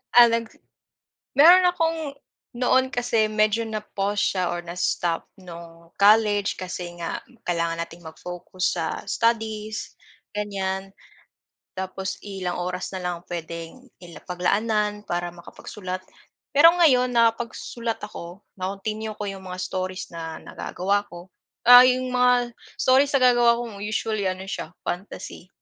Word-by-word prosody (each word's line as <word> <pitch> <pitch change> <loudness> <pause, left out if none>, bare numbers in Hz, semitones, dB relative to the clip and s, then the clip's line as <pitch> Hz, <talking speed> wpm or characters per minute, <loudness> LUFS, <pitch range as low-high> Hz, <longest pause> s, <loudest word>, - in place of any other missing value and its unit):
Ah, 240 -1 +10
nag 230 0 0 0.9
meron 350 +6 +8
akong 330 -2 +1 0.6
noon 260 +1 +3
kasi 230 -3 +1
medyo 215 +1 +2
na 215 -1 -4
pause 205 0 -2
siya 185 - +1
or 175 - -3
na 170 0 -7
stop 170 -2 -1
nung 170 -1 -12
college 205 0 +4
kasi 180 -1 -6
nga 170 - -4 0.3
kailangan 170 -1 0
nating 170 +1 -8
mag-focus 180 +3 -6
sa 165 -2 -1 0.2
studies, 220 -2 -1 0.4
gan'yan, 195 -2 -3 0.9
tapos 190 0 -4
ilang 190 -3 -4
oras 180 +2 -4
na 190 - -4
lang 175 -1 -4
puwedeng 170 +7 -7 0.2
i 170 - -12
la 150 - -11
paglaanan 210 +3 0
para 175 0 -2
makapagsulat. 185 +1 -7 0.5
Pero 330 +4 +8
ngayon 265 -8 +4
nakapagsulat 230 0 0
ako 180 -2 -8 0.2
na-continue 215 +3 -4
ko 210 - -5
yung 195 -1 -7
mga 180 0 -6
stories 185 0 -4
na 165 -1 -5
nagagawa 200 +2 -2
ko, 175 +2 -11 0.4
ah, 245 +1 +11
yung 255 0 +1
mga 250 -1 +3 0.3
stories 270 +2 +4
nag 265 -2 +4
gagawa 235 -1 +4
ko 230 -4 -6
usually 215 -1 -1
ano 185 0 -2
siya 185 - -5
fantasy. 180 -1 -6
200 Hz, 135 wpm, -24 LUFS, 180-230 Hz, 0.9 s, ah